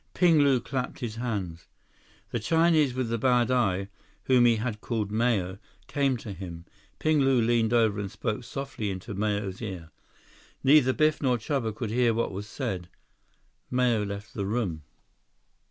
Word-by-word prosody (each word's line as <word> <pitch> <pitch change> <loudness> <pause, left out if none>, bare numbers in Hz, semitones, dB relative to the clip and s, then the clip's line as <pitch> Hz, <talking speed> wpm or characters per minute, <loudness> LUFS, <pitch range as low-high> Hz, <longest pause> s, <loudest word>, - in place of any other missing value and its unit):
Ping 170 -4 +5
Lu 140 -3 +4
clapped 125 +1 -4
his 115 -2 -4
hands. 95 -9 -4 0.6
The 120 - -1
Chinese 160 0 +3
with 130 -3 -1
the 115 0 -1
bad 125 0 +3
eye, 100 -6 +1 0.4
whom 125 -2 +4
he 120 -1 +5
had 110 -1 -3
called 110 -4 -2
Mao, 105 -5 0 0.3
came 140 -3 0
to 105 -3 -7
him. 85 -3 -8 0.3
Ping 155 -1 +2
Lu 135 -2 +4
leaned 115 -1 +2
over 110 -3 +3
and 100 -1 -3
spoke 110 +5 -3
softly 135 -5 -4
into 95 +1 -5
Mao's 100 -1 -2
ear. 90 -7 -6 0.7
Neither 135 -1 +6
Biff 155 +1 +2
nor 125 -3 +2
Chuba 115 0 -2
could 110 -1 -4
hear 120 -1 +2
what 115 - 0
was 100 +2 -6
said. 95 -8 -4 0.8
Mao 125 -3 +2
left 100 +1 -6
the 100 -2 -3
room. 100 -8 -2
115 Hz, 160 wpm, -27 LUFS, 100-130 Hz, 0.8 s, Neither